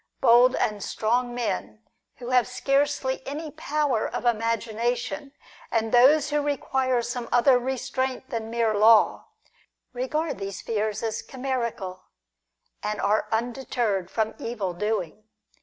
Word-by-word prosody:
Bold 245 Hz, +2 st, +6 dB
and 210 Hz, -1 st, -1 dB
strong 240 Hz, +2 st, 0 dB
men, 215 Hz, -1 st, -3 dB, 0.3 s
who 245 Hz, 0 st, -7 dB
have 250 Hz, -1 st, +4 dB
scarcely 275 Hz, +1 st, 0 dB
any 300 Hz, +2 st, -5 dB
power 295 Hz, -6 st, 0 dB
of -, -, -5 dB
imagination, 235 Hz, +4 st, -1 dB, 0.4 s
and 225 Hz, -1 st, 0 dB
those 285 Hz, +5 st, +5 dB
who 295 Hz, 0 st, +2 dB
require 265 Hz, -3 st, 0 dB
some 240 Hz, 0 st, -4 dB
other 245 Hz, +1 st, +5 dB
restraint 260 Hz, +1 st, -3 dB
than 225 Hz, -2 st, -3 dB
mere 230 Hz, -1 st, +1 dB
law, 215 Hz, +1 st, +5 dB, 0.7 s
regard 275 Hz, +2 st, -2 dB
these 195 Hz, -1 st, -5 dB
fears 215 Hz, -1 st, -2 dB
as 225 Hz, -1 st, -2 dB
chimerical, 235 Hz, -8 st, -4 dB, 0.8 s
and 210 Hz, -1 st, -3 dB
are 210 Hz, +2 st, +1 dB
undeterred 230 Hz, -5 st, -1 dB
from 220 Hz, +1 st, -1 dB
evil 210 Hz, -6 st, -3 dB
doing. 210 Hz, 0 st, -3 dB
240 Hz, 125 wpm, -25 LUFS, 220-260 Hz, 0.8 s, Bold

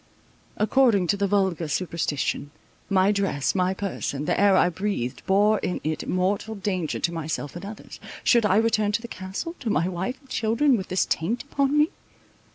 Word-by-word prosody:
According 215 Hz, -3 st, +3 dB
to -, -, +4 dB
the 200 Hz, 0 st, +1 dB
vulgar 190 Hz, -5 st, +1 dB
superstition, 150 Hz, -3 st, -2 dB, 0.4 s
my 195 Hz, 0 st, +4 dB
dress, 195 Hz, -9 st, 0 dB
my 185 Hz, 0 st, +1 dB
person, 175 Hz, -7 st, -3 dB
the -, -, 0 dB
air 200 Hz, -1 st, +5 dB
I -, -, +5 dB
breathed, 170 Hz, -9 st, -3 dB
bore 205 Hz, +3 st, +4 dB
in 180 Hz, -, -2 dB
it 155 Hz, 0 st, -3 dB
mortal 195 Hz, +4 st, 0 dB
danger 185 Hz, -5 st, -2 dB
to 170 Hz, -, 0 dB
myself 155 Hz, -2 st, -4 dB
and 175 Hz, -, -7 dB
others. 205 Hz, +2 st, -9 dB, 0.2 s
Should 235 Hz, -2 st, +4 dB
I 190 Hz, -, +3 dB
return 215 Hz, -1 st, +2 dB
to 230 Hz, -, 0 dB
the -, -, -5 dB
Castle, 190 Hz, -, -5 dB
to 240 Hz, -, -3 dB
my 175 Hz, -4 st, +1 dB
wife 185 Hz, +7 st, -3 dB
and 275 Hz, -, -23 dB
children, 240 Hz, +4 st, +2 dB
with 190 Hz, -5 st, -3 dB
this 185 Hz, -, +1 dB
taint 215 Hz, +10 st, -1 dB
upon 280 Hz, 0 st, 0 dB
me? 300 Hz, +2 st, +4 dB
195 Hz, 180 wpm, -25 LUFS, 175-220 Hz, 0.4 s, air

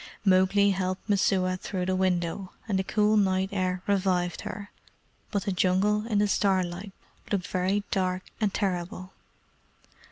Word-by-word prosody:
Mowgli 195 Hz, +1 st, +4 dB
helped 185 Hz, 0 st, -2 dB
Messua 190 Hz, -2 st, +2 dB
through 185 Hz, 0 st, -3 dB
the 185 Hz, 0 st, 0 dB
window, 185 Hz, 0 st, -1 dB
and 195 Hz, -3 st, +1 dB
the -, -, +1 dB
cool 210 Hz, +2 st, +2 dB
night 190 Hz, -1 st, +2 dB
air 185 Hz, -2 st, -1 dB
revived 185 Hz, -3 st, +1 dB
her, 205 Hz, +1 st, -7 dB, 0.6 s
but 200 Hz, -3 st, -1 dB
the 200 Hz, -, -1 dB
Jungle 195 Hz, +4 st, +2 dB
in 215 Hz, -3 st, 0 dB
the 205 Hz, 0 st, +3 dB
starlight 190 Hz, -1 st, 0 dB, 0.4 s
looked 195 Hz, -3 st, 0 dB
very 190 Hz, +3 st, 0 dB
dark 185 Hz, -1 st, 0 dB, 0.2 s
and 210 Hz, -2 st, +2 dB
terrible. 185 Hz, -1 st, -3 dB
190 Hz, 140 wpm, -27 LUFS, 185-200 Hz, 0.6 s, Mowgli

